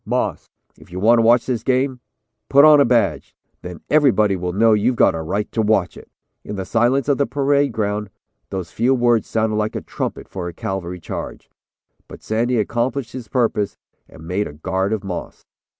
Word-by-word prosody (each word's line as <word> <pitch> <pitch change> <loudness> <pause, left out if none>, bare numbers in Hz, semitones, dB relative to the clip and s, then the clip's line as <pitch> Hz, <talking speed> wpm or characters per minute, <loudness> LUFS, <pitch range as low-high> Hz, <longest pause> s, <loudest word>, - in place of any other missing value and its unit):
Moss, - - -2 0.3
if - - -18
you 90 - -5
want 115 +4 +4
to - - +5
watch 120 +1 +4
this 125 -3 -2
game, 130 +1 0 0.5
put 140 +2 +7
on 150 -2 +7
a - - +5
badge, 115 -9 0 0.3
then 90 -1 -9
everybody 120 -10 +3
will 90 -1 -3
know 110 +4 +3
you've 110 +4 +2
got 95 - +4
a 80 - -4
right 100 +6 -3
to 115 - 0
watch 105 -5 +1
it." - - -14 0.3
In 105 - -6
the 95 -1 -4
silence 120 +7 +1
of 140 -2 +1
the 140 - +2
parade 140 +2 +1
ground 105 -1 -2 0.4
those 95 -3 -5
few 125 +4 +2
words 120 -3 +2
sounded 110 -1 0
like 110 0 -2
a - - -3
trumpet - - -5
for 90 -2 -6
a 85 - -6
cavalry 90 -1 -5
charge, - - -7 0.6
but - - -12
Sandy 120 +3 0
accomplished 120 +3 -1
his 125 -2 -8
purpose 110 -4 -1 0.3
and 80 - -13
made 95 +4 -1
a - - -10
guard 95 +6 -2
of 110 -2 -2
Moss. 90 -3 -7
110 Hz, 200 wpm, -20 LUFS, 95-125 Hz, 0.6 s, put